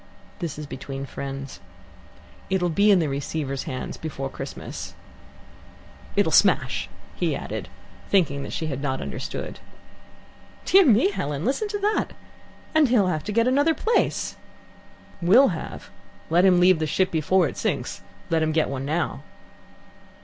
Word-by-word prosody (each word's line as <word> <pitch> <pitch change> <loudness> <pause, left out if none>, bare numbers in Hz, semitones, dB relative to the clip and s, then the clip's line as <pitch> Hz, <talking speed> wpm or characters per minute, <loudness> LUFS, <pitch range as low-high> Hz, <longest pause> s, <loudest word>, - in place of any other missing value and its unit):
"This 165 -5 -4
is 150 - -6
between 135 0 -6
friends. 135 0 -6 0.9
It'll 185 -2 +1
be 200 +6 +3
in 200 - +7
the 165 -3 +1
Receiver's 140 0 -3
hands 130 - -5
before 135 -4 -5
Christmas. - - -7 1.2
It'll - - +3
smash," - - +3 0.3
he - - 0
added, - - -5 0.4
thinking 150 -8 +2
that - - -6
she 160 - -3
had 140 -3 -3
not 135 -2 -1
understood. - - -5 1.1
"Dear 385 -3 +6
me, 250 - +5
Helen, 145 - -3
listen 275 - 0
to 410 0 -3
that. 420 +2 0 0.6
And 310 -4 +4
he'll 210 -7 +3
have 155 -4 -2
to - - -3
get 230 +3 +2
another 285 +5 +3
place!" 465 - 0 0.9
"Will 220 +11 +6
have? 165 -4 -6 0.4
Let 175 +3 +5
him 180 -2 +5
leave 180 -1 +5
the 155 - 0
ship 185 +5 +1
before 165 +2 +2
it - - -6
sinks. - - -2 0.3
Let 165 -1 +3
him 155 0 +1
get 160 0 +2
one 135 0 -4
now." 160 +4 -1
165 Hz, 150 wpm, -24 LUFS, 140-210 Hz, 1.2 s, in